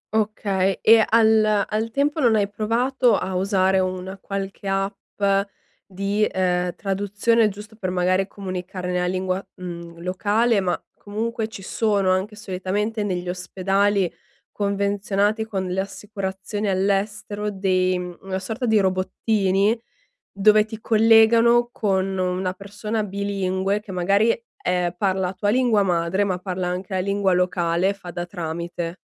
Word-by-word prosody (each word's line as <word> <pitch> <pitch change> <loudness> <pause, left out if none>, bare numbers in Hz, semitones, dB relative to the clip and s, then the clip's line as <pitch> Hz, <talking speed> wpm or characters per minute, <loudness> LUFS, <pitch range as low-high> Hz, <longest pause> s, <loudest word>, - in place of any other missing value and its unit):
Okay, 200 -3 0
e 225 0 +7
al 220 -2 +4
al 220 +1 -1
tempo 285 +5 0
non 240 -6 +4
hai 205 -2 +2
provato 235 +4 +1
a 190 0 -3
usare 190 0 +2
una 185 +1 -3
qualche 195 0 -5
app 195 +2 -3 0.7
di, 200 +2 0
uhm, 180 -1 0
traduzione 205 +3 +1
giusto 210 +2 -10
per 190 -4 -3
magari 185 +1 +1
comunicare 185 -2 -5
nella 180 0 0
lingua, 185 +1 -1
mhmm, 170 -2 -8
locale, 205 +5 +2
ma 180 -2 -1 0.2
comunque 220 +2 -3
ci 210 -3 -10
sono 200 -2 +1
anche 190 +3 -1
solitamente 205 +2 -2
negli 180 -3 -2
ospedali 195 +1 0 0.4
convenzionati 200 +1 0
con 190 -4 -3
le 185 +1 -2
assicurazioni 200 +1 -5
all'estero 205 +2 -1
dei 185 -2 +1 0.2
una 190 -1 -3
sorta 225 +6 -3
di 220 -1 +4
robottini 195 +2 +1 0.6
dove 210 +1 +4
ti 220 0 -8
collegano 230 +2 +5
con 195 -4 0
una 185 0 -1
persona 210 +3 -4
bilingue 195 0 -1
che 210 -2 -11
magari, 195 +5 +3 0.3
ehm, 180 -1 0
parla 190 -1 0
tua 205 +2 -1
lingua 235 -3 +3
madre 180 +1 +1
ma 185 -2 -1
parla 185 -1 -3
anche 185 +2 -4
la 185 - +1
lingua 200 0 +1
locale 180 0 +1
e 200 - 0
fa 180 -3 -9
da 175 0 -5
tramite. 170 0 -5
195 Hz, 135 wpm, -23 LUFS, 185-210 Hz, 0.7 s, e